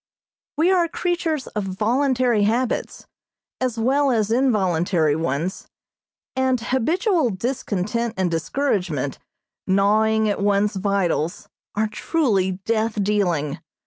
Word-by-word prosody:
We 335 +4 +3
are 355 -3 +3
creatures 335 -4 -1
of 210 - -4
voluntary 240 +4 +1
habits, 235 +3 -1 0.5
as 255 -3 -1
well 270 +5 +2
as 220 -4 +1
involuntary 185 - +2
ones, 160 +3 -2 0.7
and 260 -1 +1
habitual 310 - +1
discontent 225 +1 -2
and 185 -2 0
discouragement, 165 - -1 0.5
gnawing 215 +3 +3
at 205 -1 -1
one's 205 0 +2
vitals 190 -4 -1 0.3
are 215 +1 +1
truly 210 - 0
death 220 -2 0
dealing. 175 -7 0
215 Hz, 105 wpm, -22 LUFS, 190-255 Hz, 0.7 s, We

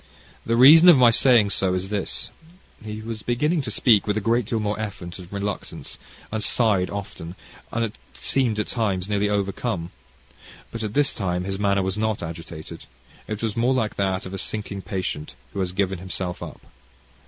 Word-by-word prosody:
The 115 - +2
reason 155 +8 +9
of 170 - +8
my 125 -2 +7
saying 115 -4 +5
so 95 -2 +1
is 95 +1 -3
this 105 -2 -2 0.2
" 185 - -25
He 110 0 -6
was 110 -1 -5
beginning 150 +9 +1
to 130 - -5
speak 110 0 +3
with 105 0 +1
a - - +2
great 115 +2 +1
deal 115 - -1
more 105 0 -2
effort 95 -5 -6
and 90 -1 -11
reluctance, 100 0 -5 0.3
and 110 -1 -2
sighed 100 -7 +2
often, 95 -4 -7 0.4
and 115 -1 -2 0.2
seemed 125 -6 0
at 105 - 0
times 100 -6 -1
nearly 105 0 +1
overcome. 100 -2 -2 0.8
But 115 - -5
at 105 -1 -4
this 145 -1 +3
time 90 -3 -2
his 95 +1 -4
manner 100 -1 +2
was 95 +2 -2
not 110 -4 -1
agitated. 80 -1 -8 0.4
It 110 +1 -4
was 110 -3 -1
more 125 +3 +2
like 110 -4 -1
that 95 -1 0
of 95 - -7
a 95 - -3
sinking 105 -1 -3
patient, 95 -6 -4 0.2
who - - -4
has 95 -2 -1
given 95 -1 -1
himself 90 -1 -4
up. - - -9
105 Hz, 190 wpm, -24 LUFS, 95-115 Hz, 0.8 s, reason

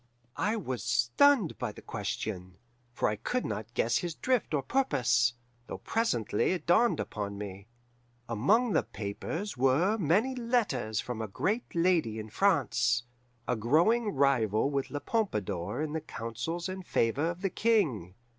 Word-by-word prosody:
"I 210 +2 +1
was 130 - -4
stunned 140 - +3
by 125 -4 -2
the - - -13
question, 95 -3 -4 0.3
for 120 - 0
I 105 - -1
could 250 - -2
not 110 +2 -5
guess 120 +1 +2
his 175 -2 -4
drift 255 -3 0
or 145 -3 0
purpose, 125 - +2 0.3
though - - -5
presently 125 - 0
it 180 - -4
dawned 230 +8 +4
upon 100 -1 -4
me. 100 0 -7 0.6
Among 200 - +2
the - - +4
papers 145 - -5
were 155 - +3
many 200 - +2
letters 220 - 0
from 120 -3 -5
a 110 - -3
great 210 - -2
lady 165 -10 +2
in 110 -1 -7
France, 120 - +2 0.4
a 125 - +1
growing 170 - +2
rival 130 -3 +2
with 140 -1 -1
La 145 - -4
Pompadour 105 - -2
in 155 -1 -4
the 160 - -2
counsels 155 - -4
and 190 0 -6
favour 140 +1 +1
of 175 +2 -6
the 195 - 0
King. 145 - +1
135 Hz, 155 wpm, -30 LUFS, -, 0.6 s, dawned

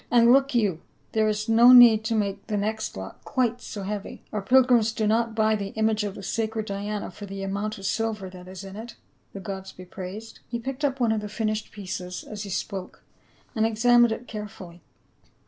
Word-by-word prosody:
"And 235 0 +6
look 275 0 +3
you, 200 -8 +1 0.3
there 220 -1 +2
is 215 +1 -2
no 230 +2 +7
need 235 -3 +9
to 225 - 0
make 200 -2 -2
the 210 - -1
next 215 - -2
lot 95 0 -8
quite 245 -2 0
so 205 - -7
heavy; 205 +1 -5
our 210 - -1
pilgrims 240 0 +4
do 220 - -1
not 225 +1 +1
buy 220 0 +3
the 200 -1 -5
image 220 -1 +1
of 205 -2 -4
the 195 - -9
sacred 220 +2 -2
Diana 205 0 -4
for 205 +3 -9
the 195 0 -6
amount 200 +3 -3
of 195 - -8
silver 220 -2 -1
that 180 -1 -12
is 185 +1 -9
in 195 0 -9
it, 225 +3 -8 0.4
the 195 - -6
gods 190 -1 -6
be 185 - -12
praised." 195 +5 -8
He 235 - -2
picked 265 +4 -6
up 275 -2 0
one 235 -3 +2
of 220 -1 0
the 210 - -6
finished 215 0 -2
pieces 180 -3 -6
as 210 -1 -7
he 205 - -6
spoke 190 0 -5 0.5
and 220 - +1
examined 235 +1 +4
it 230 +2 -5
carefully. 205 -5 -8
215 Hz, 210 wpm, -25 LUFS, 195-225 Hz, 0.5 s, need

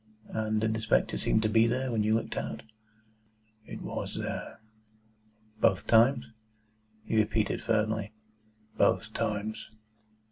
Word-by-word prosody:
"And 110 -1 -1
did 110 0 +1
the 110 - -2
spectre 110 -1 +1
seem 110 - +1
to 110 - +2
be 110 +1 +4
there, 130 +2 -1
when 110 -2 +1
you 110 +1 +2
looked 115 - -2
out?" 70 +2 -4 1.0
"It - - -7
WAS - - -4
there." - - -5 1.0
"Both 100 -5 +3
times?" 120 +3 +4 0.8
He 110 - -1
repeated 110 -1 +1
firmly: 110 -2 0 0.7
"Both - - +2
times." 105 +1 -3
110 Hz, 130 wpm, -29 LUFS, 105-115 Hz, 1.0 s, be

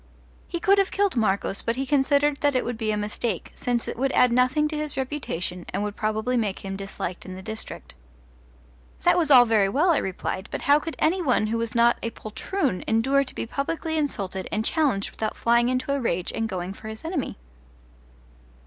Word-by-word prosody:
He 345 - -3
could 395 +3 +4
have 390 - +2
killed 400 -4 +1
Marcos, 200 -3 +1
but 230 - -1
he 270 +2 -2
considered 285 +1 +2
that 285 -2 +1
it 255 - +1
would 245 - -2
be 220 -1 -2
a 210 - +1
mistake, 210 -1 -3
since 245 -2 -1
it - - -4
would 270 +1 +1
add 250 - +5
nothing 255 +5 +3
to 310 - -4
his 300 -2 -2
reputation 255 - -3
and 205 - -2
would 210 0 -3
probably 220 +3 -1
make 205 -4 -2
him 195 0 -4
disliked 195 -2 -5
in 185 - -8
the 190 - -9
district. 220 +1 -7 1.1
That - - +5
was 330 -4 +2
all 250 -4 +9
very 215 -4 +3
well, 310 - +3
I 315 - +3
replied, 190 +1 -4
but - - -4
how 290 +1 +5
could 325 +1 -6
any 360 +4 +2
one 255 -9 +2
who 230 +2 -1
was 230 0 -3
not 235 0 +4
a 230 - -2
poltroon 230 - -3
endure 265 +5 +3
to 270 - -9
be - - -3
publicly 320 +6 -3
insulted 195 - -2
and 215 +1 -1
challenged 275 -12 +1
without 215 -1 -3
flying 235 +1 +3
into 255 +2 0
a 280 - -1
rage 180 -6 -1
and 225 0 -2
going 185 -1 -4
for 215 - -11
his 220 +6 -8
enemy? 325 -5 -3
240 Hz, 210 wpm, -25 LUFS, 210-285 Hz, 1.1 s, all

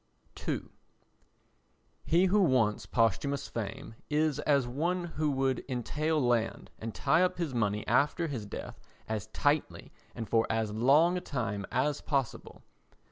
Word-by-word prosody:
ii - - 0 1.4
He 175 +3 +3
who 200 +3 +3
wants 125 - +2
posthumous 120 +5 +1
fame 110 0 -5 0.2
is 150 -1 +1
as 140 -3 +2
one 170 +8 -1
who 155 -3 -1
would 135 -2 0
entail 150 +6 -1
land, 120 -4 0
and 110 0 -6
tie 160 - +3
up 185 -1 +2
his 165 -6 -2
money 105 -3 0
after 140 +7 +2
his 125 -10 -4
death - - -7 0.3
as 110 -3 -3
tightly 145 +1 -1 0.2
and 115 - -5
for 115 -1 +2
as 110 -1 0
long 145 +11 +4
a - - -3
time 105 - -3
as 145 +3 0
possible. 135 -5 -3
135 Hz, 140 wpm, -30 LUFS, 115-155 Hz, 1.4 s, long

